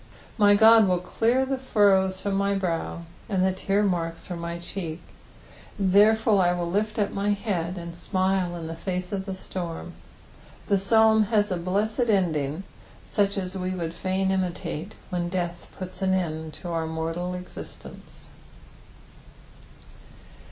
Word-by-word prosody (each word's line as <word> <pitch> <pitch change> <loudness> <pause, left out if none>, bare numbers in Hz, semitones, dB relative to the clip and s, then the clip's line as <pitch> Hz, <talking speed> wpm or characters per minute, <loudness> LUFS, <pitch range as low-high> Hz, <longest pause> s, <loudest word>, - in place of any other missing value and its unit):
Uy 205 -1 +6
Qod 220 -1 +7
will 180 -1 +3
clear 230 +8 +1
the 265 0 -2
furrows 195 -6 +3
from 200 - -1
my 200 0 +1
brow, 170 -3 -2 0.3
and 190 -3 +2
the 190 - +3
tear 195 +2 0
marks 165 -4 -1
from 175 -2 -5
my 170 0 -4
cheek; 170 -1 -5 0.8
therefore 210 +3 +4
will 195 - +5
I 175 0 +2
lift 205 +5 -1
up 205 -2 +1
my 200 +1 -1
head 190 -4 -1
and 170 -1 -7
smile 185 0 0
in 170 -1 -6
the 165 +1 -5
face 180 +1 -4
of 195 -1 -3
the 190 - -3
storm. 175 -3 -6 0.7
The 200 -2 +2
Psalm 220 +2 +4
has 210 -1 +1
a 180 - 0
blessed 210 +7 0
ending, 165 -5 +1 0.4
such 200 0 +1
as 185 -1 -3
we 185 0 -2
would 165 -2 -3
fain 190 +2 -1
imUate 185 -1 -2 0.2
when 175 -1 -1
death 175 -1 -3
puts 185 0 -8
an 190 0 +2
end 160 -3 -3
to 175 - -7
our 165 -1 -1
mortal 165 +3 -3
existence. 180 0 -10
185 Hz, 150 wpm, -26 LUFS, 175-200 Hz, 0.8 s, Qod